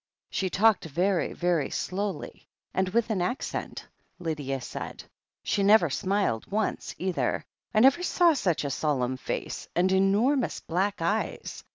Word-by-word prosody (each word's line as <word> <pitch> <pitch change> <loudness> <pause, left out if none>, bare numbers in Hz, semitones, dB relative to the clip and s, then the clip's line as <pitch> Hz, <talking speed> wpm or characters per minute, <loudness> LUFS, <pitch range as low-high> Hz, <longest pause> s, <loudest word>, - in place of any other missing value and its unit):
"She 190 - -1
talked 215 +2 +3
very, 175 +5 0
very 175 -5 0
slowly, 200 +1 -4 0.3
and 190 0 +1
with 230 +3 +1
an 195 -4 0
accent," 185 +10 -3 0.3
Lydia 150 -6 -3
said. 125 - -7 0.4
"She 200 - 0
never 195 -6 +5
smiled 190 - 0
once, 215 +1 -1
either 185 -1 -1
— - - -48
I 215 - +6
never 270 +7 +6
saw 350 -1 +4
such 185 - 0
a 140 - -2
solemn 130 -3 0
face, - - -4
and 180 +2 +3
enormous 205 +8 +2
black 190 +2 -1
eyes. 205 +6 -2
190 Hz, 145 wpm, -27 LUFS, 165-210 Hz, 0.4 s, I